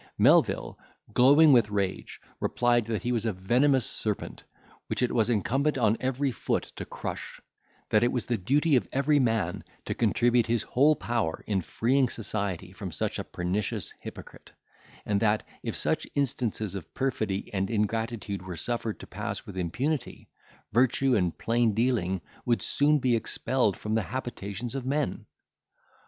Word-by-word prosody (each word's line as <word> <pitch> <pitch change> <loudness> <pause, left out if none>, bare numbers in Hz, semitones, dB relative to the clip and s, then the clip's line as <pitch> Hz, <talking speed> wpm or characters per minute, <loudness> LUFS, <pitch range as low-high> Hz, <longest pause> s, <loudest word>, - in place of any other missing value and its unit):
Melvil, - - +3 0.3
glowing 145 +5 +7
with 115 -4 +5
rage, 100 -2 -2 0.2
replied, 120 -2 +2
that 110 -1 -3
he 120 - 0
was 115 -3 0
a - - +2
venomous 125 +7 +2
serpent, 105 -2 -2 0.4
which - - -1
it 125 - +1
was 115 -1 +2
incumbent 135 - +1
on 110 -3 +3
every 130 +1 0
foot - - -1
to - - -5
crush; - - -6 0.5
that 105 - +5
it 120 - +3
was 125 - -1
the 120 - 0
duty 145 - +2
of 125 - +2
every 145 +2 +3
man 110 -9 0 0.2
to - - -2
contribute 120 -1 +2
his 115 -2 +1
whole 145 +7 +4
power 115 - -2
in 100 -3 0
freeing 125 +7 +1
society 100 -5 -3
from 95 -1 -7
such 70 - -2
a - - -2
pernicious 90 +3 -3
hypocrite; - - -10 0.6
and 100 -1 +1
that, 105 0 +1 0.2
if - - -4
such - - 0
instances 120 -7 -1
of 95 -4 -7
perfidy 110 -9 -2
and 95 0 0
ingratitude 110 -2 -2
were 90 -2 -7
suffered 115 +3 -3
to - - -9
pass - - -5
with 100 - -9
impunity, 120 - -2 0.5
virtue 130 +2 +3
and 90 -4 0
plain 115 -2 +1
dealing 110 -7 +1 0.2
would 120 -5 +1
soon 150 +1 +3
be 125 -3 +2
expelled 115 -1 0
from 105 - -3
the 110 - +2
habitations 115 +1 -5
of 135 -2 -3
men. 140 +3 -2
115 Hz, 160 wpm, -28 LUFS, 100-130 Hz, 0.6 s, glowing